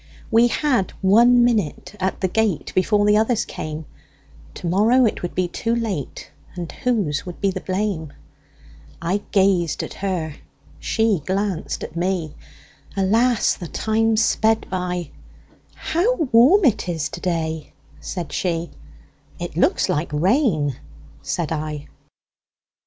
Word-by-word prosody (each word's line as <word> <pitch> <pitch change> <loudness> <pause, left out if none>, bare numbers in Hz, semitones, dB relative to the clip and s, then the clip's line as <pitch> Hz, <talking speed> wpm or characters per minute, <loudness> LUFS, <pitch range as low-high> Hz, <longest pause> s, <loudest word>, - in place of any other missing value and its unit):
We 230 +2 +6
had 245 -6 0
one 235 +5 +6
minute 215 -8 0
at 190 - -2
the 190 - +2
gate, 210 -4 0
Before 205 +2 +2
the 210 0 +5
others 220 +1 +1
came; 155 0 -6 0.7
To - - -8
morrow 220 +9 +4
it 220 - -1
would 175 - -5
be 185 -1 +1
too 230 +6 -1
late, 205 - -4 0.2
And 175 -3 -5
whose 205 -13 -1
would 175 - -7
be 200 -1 +1
the 190 0 -5
blame!I 170 - -5
gazed 190 -5 +2
at - - -7
her, 175 -6 -3 0.4
she 220 -7 +1
glanced 190 -2 -2
at 155 - -8
me; 175 -3 -1 0.6
Alas! 225 +5 +3
the 175 - -7
time 220 +4 +1
sped 220 0 +2
by:"How 180 - -3
warm 305 - +5
it 215 -7 +2
is 160 -3 -1
to 175 - -8
day!" 160 -3 -2 0.3
said 150 - -5
she;"It 70 - -6
looks - - +2
like 150 +2 -1
rain," 160 - +1 0.4
said 155 - -3
I. 150 -2 -4
190 Hz, 125 wpm, -22 LUFS, 165-225 Hz, 0.7 s, We